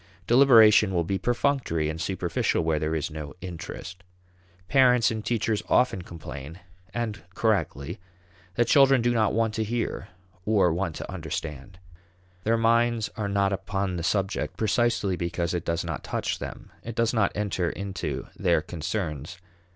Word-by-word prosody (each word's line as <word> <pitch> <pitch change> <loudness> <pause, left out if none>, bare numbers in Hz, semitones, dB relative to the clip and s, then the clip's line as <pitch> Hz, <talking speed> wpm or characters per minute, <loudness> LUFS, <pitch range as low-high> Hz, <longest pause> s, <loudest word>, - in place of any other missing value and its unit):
Deliberation 110 -6 +6
will 85 - +2
be 95 +3 -2
perfunctory 120 - 0
and 80 +1 -4
superficial 90 -2 0
where 80 -1 +1
there 80 +1 -1
is 80 0 -2
no 75 -3 -7
interest. 90 0 -8 0.7
Parents 125 -3 +4
and 110 -1 -4
teachers 115 -2 0
often 125 -7 +3
complain 80 -1 -9 0.3
and 110 0 -3
correctly 95 -7 -1 0.6
that 120 - +3
children 135 -1 +5
"do 120 - +3
not 110 -2 +2
want 115 -1 +1
to 110 - -1
hear, 115 -3 -3 0.4
or 100 -5 +3
want 85 -2 -2
to - - -6
understand." 75 +4 -6 0.7
Their 115 +1 +3
minds 115 0 +2
are 105 -3 -2
not 100 0 +1
upon 95 -1 -2
the - - -3
subject 95 +4 -1
precisely 110 -3 +1
because 85 -1 -2
it 85 -2 -2
does 85 0 -1
not 80 -4 -4
touch - - -2
them; - - -8
it 115 -1 -7
does 115 0 +1
not 110 -4 +2
enter 100 -4 -1
into 95 -1 -4
their - - +2
concerns. 85 -2 -4
100 Hz, 150 wpm, -26 LUFS, 85-115 Hz, 0.7 s, Deliberation